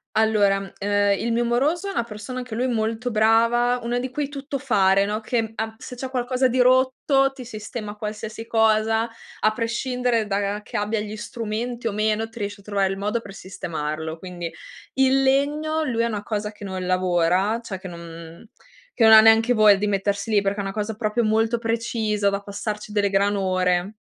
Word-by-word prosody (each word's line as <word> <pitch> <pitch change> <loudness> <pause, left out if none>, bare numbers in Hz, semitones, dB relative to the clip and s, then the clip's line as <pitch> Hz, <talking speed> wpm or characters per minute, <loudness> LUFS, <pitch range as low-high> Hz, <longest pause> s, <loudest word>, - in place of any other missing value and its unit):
Allora, 205 -3 +2
ehm, 205 0 +2
il 235 - -1
mio 235 +1 +1
moroso 290 +11 +1
è - - -2
una 300 - -1
persona 230 +3 -7
anche 245 -3 -6
lui 245 +3 0
molto 230 +1 -1
brava, 230 +3 +3
una 240 +1 -1
di 255 +1 -3
quei 285 +2 -3
tuttofare, 265 -9 +1
no, 210 +1 -2
che 225 -1 -1
a 220 0 -4
se 250 - -9
c'è 260 +1 -5
qualcosa 255 0 +1
di 255 +1 -1
rotto 260 +2 +3
ti 265 -2 -10
sistema 215 -1 -7
qualsiasi 215 +1 -6
cosa 220 0 +2 0.3
a 215 - +3
prescindere 235 0 -1
da 200 0 -1
che - - -5
abbia 210 +1 -1
gli 210 0 -5
strumenti 230 +1 -5
o - - 0
meno, 215 +1 0
ti 225 +1 -12
riesce 205 0 -5
a - - -24
trovare 200 -2 0
il 195 - -4
modo 210 +4 -1
per 200 -3 -11
sistemarlo. 160 -3 -5
Quindi, 175 -1 -6 0.4
il 265 0 +3
legno 295 +4 +1
lui 235 -6 -1
è - - +2
una 210 -3 -4
cosa 210 -1 -3
che 210 -1 -14
non 190 -2 -4
lavora, 185 +3 +2
cioè 210 -5 -6
che 185 0 -9
non 170 +2 -10 0.5
che 235 - +2
non 220 - +8
ha 220 - +11
neanche 225 +2 +5
voglia 215 -3 +6
di 210 +2 -1
mettersi 200 +1 -1
lì, 205 -2 +4
perché 200 +1 -1
è - - -1
una 195 - -3
cosa 215 +1 -3
proprio 215 +2 0
molto 225 +2 +2
precisa 225 -3 0
da 200 0 -2
passarci 210 +1 -5
delle 205 -1 +1
gran 200 +1 +2
ore 185 0 0
220 Hz, 195 wpm, -23 LUFS, 200-240 Hz, 0.5 s, ha